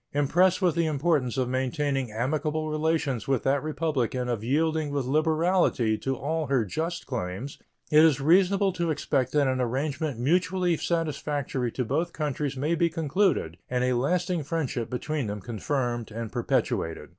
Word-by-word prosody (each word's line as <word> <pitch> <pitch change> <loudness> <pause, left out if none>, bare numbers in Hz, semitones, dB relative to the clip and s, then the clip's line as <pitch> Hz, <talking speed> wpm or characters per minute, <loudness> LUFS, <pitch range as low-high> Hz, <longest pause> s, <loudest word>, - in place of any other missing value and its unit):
Impressed 175 +7 +3
with 175 -3 +4
the 165 0 +1
importance 145 -4 0
of 130 -2 +1
maintaining 130 0 -1
amicable 155 +6 -1
relations 155 -6 0
with 135 -3 +1
that 135 +1 +2
Republic 155 -5 -1
and 125 -1 -1
of 110 -3 -3
yielding 155 +4 +1
with 140 -2 -1
liberality 155 -4 +2
to 135 +4 -2
all 155 +4 -2
her 130 -5 +2
just 165 - -3
claims, 115 +2 -5 0.3
it 155 +1 +7
is 155 -4 +4
reasonable 190 +6 +3
to 170 -2 -1
expect 135 -4 0
that 145 0 +3
an 130 -1 0
arrangement 135 +3 -2
mutually 175 +5 +2
satisfactory 145 -6 -2
to 125 - -2
both 160 +8 -1
countries 145 -3 -2
may 150 +5 0
be 170 0 +2
concluded 165 - 0
and 125 0 0
a 125 0 +2
lasting 175 +7 0
friendship 140 -6 -2
between 140 +1 -2
them 105 0 -4
confirmed 120 +3 -2
and 115 0 -5
perpetuated. 80 - -1
145 Hz, 160 wpm, -27 LUFS, 125-160 Hz, 0.3 s, it